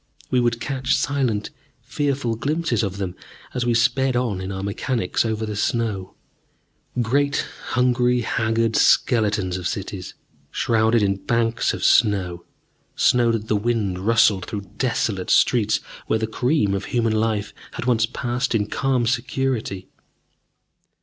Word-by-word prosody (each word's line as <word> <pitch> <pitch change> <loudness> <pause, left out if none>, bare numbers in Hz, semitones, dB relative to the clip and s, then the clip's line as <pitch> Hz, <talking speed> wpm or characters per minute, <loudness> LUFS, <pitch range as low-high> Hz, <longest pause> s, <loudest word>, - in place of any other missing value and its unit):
We 125 - +3
would 120 -1 +1
catch 130 0 0
silent, 130 -7 -1 0.3
fearful 135 -2 -1
glimpses 145 -1 0
of 100 -3 -3
them 95 -3 -4 0.4
as 125 -1 -1
we 120 - +2
sped 125 +2 +2
on 115 -6 -1
in 95 +1 -4
our 95 0 -4
machines 100 0 -1
over 110 -1 -2
the 105 -1 -4
snow 105 -3 -1 0.9
great 140 +5 +1 0.3
hungry, 125 0 +2
haggard 115 0 0
skeletons 105 -6 +2
of 90 -1 -3
cities, 100 -3 -5 0.3
shrouded 110 -1 +2
in 100 -1 +1
banks 115 -1 +1
of - - -5
snow, 90 -6 +2 0.5
snow 120 -2 +3
that 110 -1 -2
the 110 - +1
wind 105 -4 0
rustled 105 -3 +3
through 100 -3 -6
desolate 110 -7 -1
streets 110 -4 +3 0.3
where 110 - +2
the 110 - -1
cream 120 -1 +1
of 100 - -2
human 115 -2 0
life 110 -1 -1 0.3
once 115 -3 +3
had 115 - -18
passed 120 0 -1
in 105 -2 +1
calm 130 +2 0
security. 120 -5 -2
115 Hz, 140 wpm, -22 LUFS, 105-125 Hz, 0.9 s, We